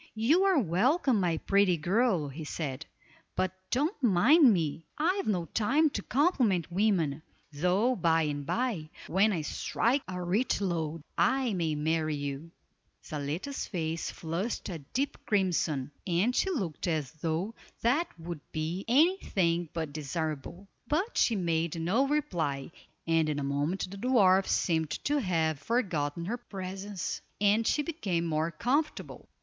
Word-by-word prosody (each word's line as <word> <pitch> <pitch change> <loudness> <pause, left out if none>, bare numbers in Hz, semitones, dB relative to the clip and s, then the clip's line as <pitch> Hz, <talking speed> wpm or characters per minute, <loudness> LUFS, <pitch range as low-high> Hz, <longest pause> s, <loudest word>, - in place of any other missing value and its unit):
"You 295 - +3
are 385 -4 +4
welcome, 245 - +2
my 175 -3 +1
pretty 195 0 +3
girl," 185 0 +1
he 150 +4 -7
said, 150 -1 -4 0.5
"but 185 -1 0 0.2
don't 295 - 0
mind 245 - +6
me; 165 -4 -1
I've 365 +6 +1
no 180 -5 0
time 280 - +2
to - - -3
compliment 245 - +1
women, 170 -7 +1 0.3
though 185 - +2
by 165 -4 +2
and 145 -1 -2
by, 200 - -2 0.2
when 200 +4 +3
I 165 -6 -1
strike 245 - 0
a 180 0 -5
rich 200 +9 +1
lode, 165 -5 -2 0.2
I 240 +7 +2
may 165 -4 0
marry 155 0 0
you." 145 +2 -5 0.6
Zaletta's 155 - -4
face 165 -3 -2
flushed 175 +9 -3
a 170 -3 -5
deep 260 - -3
crimson, 170 - +1 0.2
and 190 +8 +2
she 385 - +2
looked 190 - -2
as 155 -6 -1
though 165 +6 -2 0.3
that 280 +9 +3
would 165 -1 -6
be 165 +4 -3
any 315 +10 +5
thing 170 -3 0
but 160 -3 -4
desirable; 155 +4 -4 0.2
but 365 +10 0
she 230 - +3
made 165 -3 0
no 210 +12 +2
reply, 170 - -1 0.3
and 165 -1 +2
in 150 - -1
a 145 - -2
moment 145 +8 -1
the 200 - -7
dwarf 195 -5 +4
seemed 160 -3 +1
to 290 0 +1
have 160 - 0
forgotten 170 - -1
her 230 +6 -2
presence, 195 -3 -5 0.2
and 210 +3 +3
she 295 - +2
became 200 - -2
more 160 0 0
comfortable. 265 - -2
180 Hz, 145 wpm, -30 LUFS, 160-235 Hz, 0.6 s, mind